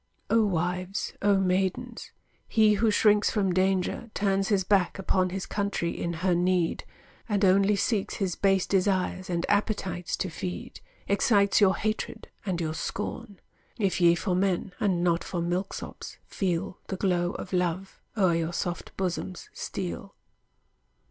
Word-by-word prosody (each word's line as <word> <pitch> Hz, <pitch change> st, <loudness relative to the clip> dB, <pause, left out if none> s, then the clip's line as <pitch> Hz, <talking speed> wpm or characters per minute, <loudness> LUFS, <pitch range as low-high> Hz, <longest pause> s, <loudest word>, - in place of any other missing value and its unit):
O 225 Hz, 0 st, +5 dB
wives, 180 Hz, 0 st, -1 dB
O 200 Hz, -1 st, +4 dB
maidens, 195 Hz, +6 st, -1 dB, 0.4 s
he 215 Hz, -2 st, +4 dB
Who 215 Hz, +2 st, +2 dB
shrinks 210 Hz, 0 st, +4 dB
from 195 Hz, -4 st, +1 dB
danger, 190 Hz, +4 st, 0 dB
turns 195 Hz, -1 st, +1 dB
his 200 Hz, -3 st, +2 dB
back 190 Hz, -1 st, +2 dB
upon 185 Hz, -1 st, +1 dB
His 190 Hz, +1 st, -4 dB
country 200 Hz, -4 st, -1 dB
in 170 Hz, -, -3 dB
her 185 Hz, -, +4 dB
need, 175 Hz, -1 st, +1 dB, 0.4 s
and 205 Hz, -1 st, +2 dB
only 195 Hz, +2 st, +4 dB
seeks 200 Hz, 0 st, 0 dB
His 190 Hz, -3 st, -1 dB
base 195 Hz, -1 st, +2 dB
desires 185 Hz, -1 st, 0 dB
and 170 Hz, -1 st, -1 dB
appetites 195 Hz, -4 st, -1 dB
to 185 Hz, -, -3 dB
feed, 180 Hz, +2 st, -6 dB, 0.3 s
Excites 200 Hz, 0 st, +3 dB
your 190 Hz, -2 st, +5 dB
hatred 220 Hz, +1 st, -3 dB, 0.2 s
and 180 Hz, -3 st, -1 dB
your 160 Hz, -2 st, -2 dB
scorn; 205 Hz, +5 st, -5 dB, 0.4 s
If 195 Hz, -4 st, 0 dB
ye 170 Hz, 0 st, +6 dB
for 185 Hz, +1 st, -1 dB
men, 190 Hz, 0 st, 0 dB
and 180 Hz, -4 st, +1 dB
not 170 Hz, -1 st, +2 dB
for 175 Hz, -, -4 dB
milk 175 Hz, +3 st, -1 dB
sops, -, -, -8 dB
feel 185 Hz, -1 st, -2 dB
The 190 Hz, -, -4 dB
glow 180 Hz, -2 st, +1 dB
of 190 Hz, -, -7 dB
love 180 Hz, +1 st, -1 dB, 0.2 s
o'er 185 Hz, -4 st, +4 dB
your 165 Hz, 0 st, -1 dB
soft 175 Hz, 0 st, -4 dB
bosoms 185 Hz, -1 st, -3 dB
steal. 195 Hz, +1 st, -5 dB
190 Hz, 150 wpm, -27 LUFS, 180-200 Hz, 0.4 s, ye